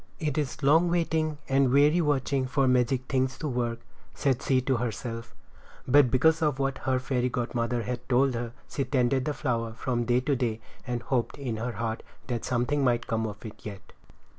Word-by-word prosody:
"It 150 -5 -1
is 150 -1 -3
long 160 +5 +5
waiting 160 -3 0
and 135 -1 +3
weary 145 +5 +5
watching 135 -3 +1
for 135 0 +2
magic 125 0 +2
things 130 -1 0
to 155 - -3
work," 120 -3 -2 0.3
said 135 -4 +1
she 130 -1 +2
to 130 0 +1
herself; 115 0 -4 0.5
but 135 0 +6
because 160 +6 +3
of 150 -4 +1
what 135 -1 -1
her 130 - +3
fairy 125 -1 0
godmother 120 -1 -1
had 125 +2 -5
told 130 +1 +3
her, 115 0 -3 0.2
she 140 - -2
tended 130 0 +1
the 150 - 0
flower 115 -5 -1
from 120 0 -2
day 120 +1 +3
to 140 +2 +1
day, 120 -4 -1 0.3
and 120 -1 -2
hoped 125 -3 -1
in 125 -6 -3
her 120 +2 -3
heart 115 -1 -3 0.2
that 120 -3 -3
something 130 +4 0
might 120 -2 +2
come 110 0 -1
of 105 +2 -9
it 110 - -10
yet. 100 -2 -9
130 Hz, 190 wpm, -28 LUFS, 120-140 Hz, 0.5 s, but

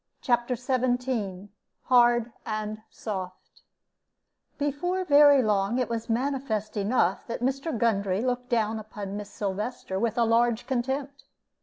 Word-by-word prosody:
CHAPTER 240 -1 +1
XVII 245 -6 -1 0.3
HARD 240 -1 +4
AND 215 0 -4
SOFT 185 -4 -7 1.0
Before 355 +6 -1
very 285 -3 +7
long 205 +1 +1
it 255 - 0
was 230 0 -3
manifest 240 -3 -1
enough 200 -2 +1
that 235 - -4
Mr. 270 +2 -1
Gundry 200 -3 +1
looked 250 -1 -2
down 220 -2 +1
upon 205 -2 -7
Miss 205 0 -6
Sylvester 200 0 -3
with 230 +1 -1
a 235 - +4
large 230 0 +2
contempt. 275 +2 -3
235 Hz, 125 wpm, -27 LUFS, 210-255 Hz, 1.0 s, very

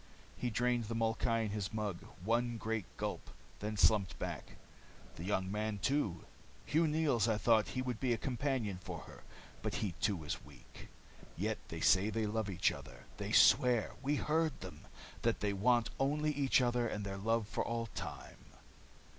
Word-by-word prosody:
He 125 - -2
drained 120 +1 +1
the 115 +2 -4
molkai 115 0 +1
in 105 - -3
his 105 -1 -3
mug, 105 -5 -2 0.2
one 120 +2 +1
great 110 -2 -2
gulp, - - -4 0.3
and 105 +1 -3
slumped 100 -1 +4
back. - - -5 0.6
"The 80 - -7
young 95 0 0
man, 105 0 -1
too, 100 - 0 0.4
Hugh 160 +2 +3
Neils. 150 -8 +2
I 110 -2 +2
thought 110 +1 +4
he 130 - +1
would 125 -3 -3
be 130 -2 +1
a 115 - +2
companion 125 -7 -1
for - - -6
her. - - -12 0.4
But - - -2
he 105 - -1
too 95 -7 +1
is 75 - -4
weak. 70 -4 -14 0.5
Yet 110 +5 -1
they 80 0 -6
say 95 +5 +5
they 110 0 0
love 105 0 -1
each 90 -2 +2
other. - - -10
They - - -4
swear 120 -3 +5
we 145 +2 +1
heard 160 +2 0
them 90 -5 -9 0.3
that - - +1
they 100 -1 0
want 120 +3 +3
only 150 +3 +1
each 140 -2 +3
other 120 -1 +1
and 105 -2 -3
their 100 0 -4
love 115 +1 +1
for - - -1
all 115 0 -2
time." 115 - -8
110 Hz, 180 wpm, -35 LUFS, 100-125 Hz, 0.6 s, say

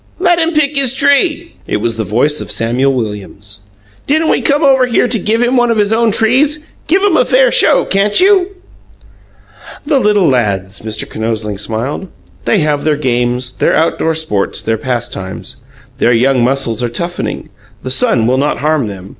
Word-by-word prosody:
"Let 350 -1 +2
him 330 0 0
pick 300 -1 +1
his 265 -2 +1
tree!" 300 +5 +1
It - - -1
was 115 +2 -2
the 110 - -2
voice 125 +9 0
of - - -8
Samuel 125 +4 0
Williams. 105 -2 -6 0.5
"Didn't 315 +3 +1
we - - +1
come 290 +1 +1
over 265 -2 +4
here 245 0 +1
to 235 - -1
give 225 +5 0
him 245 +2 +1
one 240 0 +2
of 230 - +1
his 210 +1 +1
own 230 0 +2
trees? 270 +8 +1 0.2
Give 375 +6 +2
him 400 -5 +3
a - - +4
fair - - +3
show, - - +3
can't 200 +1 +1
you?" 380 -1 +4 1.4
"The 290 -2 +2
little 210 -6 +2
lads!" 100 -7 -1
Mr. 110 0 -5
Kinosling 110 -2 -4
smiled. 115 - -4 0.4
"They 205 - +2
have 150 -1 0
their 155 -1 +1
games, 125 -2 -1
their - - +1
outdoor 160 0 0
sports, 130 -11 -2
their 110 -1 -1
pastimes. 120 -6 -5 0.4
The 120 - +3
young 125 +1 +2
muscles 125 -2 0
are 120 - -1
toughening. 170 +9 -5 0.3
The 130 - -4
sun 125 -3 +2
will 130 +3 +1
not 145 +2 0
harm 150 -4 0
them. 95 -2 -9
150 Hz, 180 wpm, -13 LUFS, -, 1.4 s, over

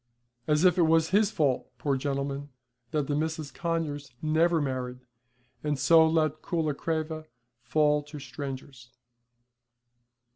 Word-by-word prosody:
As 150 +3 +3
if 180 0 +5
it 165 - +5
was 160 0 +4
his 205 +1 +4
fault, 145 - 0
poor 140 -2 0
gentleman, 140 +1 -3 0.4
that 150 +2 0
the 145 - -2
Misses 155 -1 -2
Conyers 155 -5 -3
never 160 +2 +2
married, 130 -3 -3 0.6
and 150 -1 0
so 160 +4 +6
let 155 -1 +1
Coolacreva 155 0 -2 0.3
fall 150 +4 +2
to 150 +1 -9
strangers. 135 -3 -7
150 Hz, 120 wpm, -28 LUFS, 140-160 Hz, 0.6 s, so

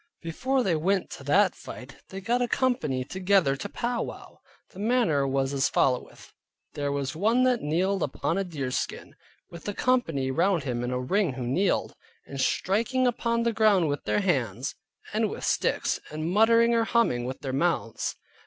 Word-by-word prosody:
Before 255 +11 0
they 180 -6 +1
went 190 +5 0
to - - -8
that 185 +6 +4
fight 130 +2 -10
they 195 0 -7
got 240 +5 0
a 245 - +1
company 240 - 0
together 185 -2 +2
to - - -6
pow 240 0 -2
wow. - - -8 0.3
The 185 - -12
manner 205 - +2
was 135 0 0
as 135 -1 +2
followeth: 125 -2 -1 0.4
there 145 -1 -2
was 140 0 -2
one 225 +9 +2
that 250 -2 +2
kneeled 185 +6 0
upon 165 +5 -1
a - - 0
deerskin, 140 -8 -4 0.4
with 170 - -10
the 205 - -3
company 165 - +1
round 175 +2 +2
him 120 -3 -2
in 125 - -2
a 125 0 -1
ring 180 +5 +1
who 125 -1 -5
kneeled, 180 +11 0 0.3
and 140 -1 -5
striking 230 - +1
upon 235 -1 0
the 235 0 +1
ground 205 -7 +3
with 145 - -3
their 210 - +1
hands, 130 - -1 0.4
and - - +1
with - - -7
sticks, - - 0
and 155 +2 -3
muttering 230 +3 +5
or 230 -1 +2
humming 225 - +1
with 130 +1 -5
their 135 -2 -4
mouths. 140 -6 -1
175 Hz, 180 wpm, -27 LUFS, 135-225 Hz, 0.4 s, muttering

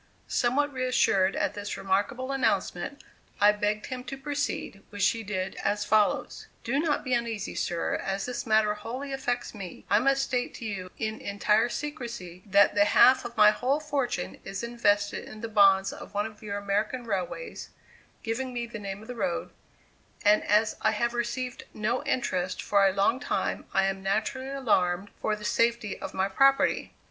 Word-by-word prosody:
Somewhat 280 +4 +1
reassured 250 -7 +2
at - - 0
this 205 0 -5
remarkable 245 +8 -1
announcement, 270 -1 -1 0.4
I 205 +1 +7
begged 210 0 -1
him 255 -1 -5
to 270 +1 -6
proceed, 285 -7 -3
which 205 -2 +1
he 230 - -3
did 190 -3 -3
as 205 0 0
follows: 215 -1 +1 0.2
"Do 265 +5 0
not 300 -1 0
be 255 - -1
uneasy, 230 -4 -1
sir, 170 -1 -1
as 195 0 -3
this 250 -1 -4
matter 215 -1 +4
wholly 250 +7 -6
affects 245 -2 -2
me; 195 -5 -9
I 205 - +6
must 275 +2 +2
state 250 -2 -2
to 230 - -7
you 190 -4 -4
in 220 0 -3
entire 210 +3 +2
secrecy 235 - -6
that 200 +1 +5
the 205 0 +4
half 255 +4 +6
of 240 -1 -7
my 210 0 +8
whole 265 +6 0
fortune 280 -5 -2
is 195 +2 -5
invested 205 -4 +1
in 215 - -10
the 230 - -3
bonds 195 -3 +4
of - - -11
one 205 +1 +1
of 215 -1 -9
your 205 -2 -4
American 205 +5 -1
railways 220 - -4 0.5
(giving 250 +3 -2
me 240 -1 -3
the 235 -2 -8
name 200 0 -6
of - - -13
the 250 - -5
road), 180 -7 -2 0.7
and 210 +1 +5
as 210 +1 +2
I 220 - +3
have 235 +3 0
received 240 +1 -3
no 220 +4 -1
interest 185 -7 -1
for 200 -1 +3
a - - +3
long 200 +6 +2
time 290 - -2
I 195 - +3
am 195 0 -1
naturally 220 +7 -1
alarmed 205 -8 +1
for 215 - +1
the 210 0 -9
safety 230 -1 +1
of - - -7
my 190 +1 +1
property. 275 +7 +3
220 Hz, 180 wpm, -28 LUFS, 200-250 Hz, 0.7 s, my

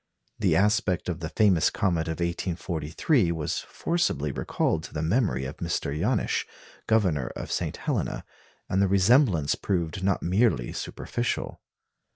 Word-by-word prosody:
The - - +2
aspect 105 -3 +2
of 85 -1 -3
the 80 -2 -4
famous 95 -5 +3
comet 85 -4 0
of 80 0 -3
1843 85 - 0
was 80 -3 -2
forcibly 75 - -1
recalled 80 +4 -1
to - - -11
the 75 - -1
memory 85 - +1
of 65 - -6
Mr. 85 -4 -2
Janisch, 105 +9 0 0.4
Governor 90 - +2
of - - -6
St. - - -2
Helena; - - -2 0.4
and 95 - +1
the 100 - +4
resemblance 100 - +4
proved 90 -1 -2
not 95 -1 +1
merely 90 - +2
superficial. 120 0 -3
90 Hz, 140 wpm, -27 LUFS, 80-105 Hz, 0.4 s, the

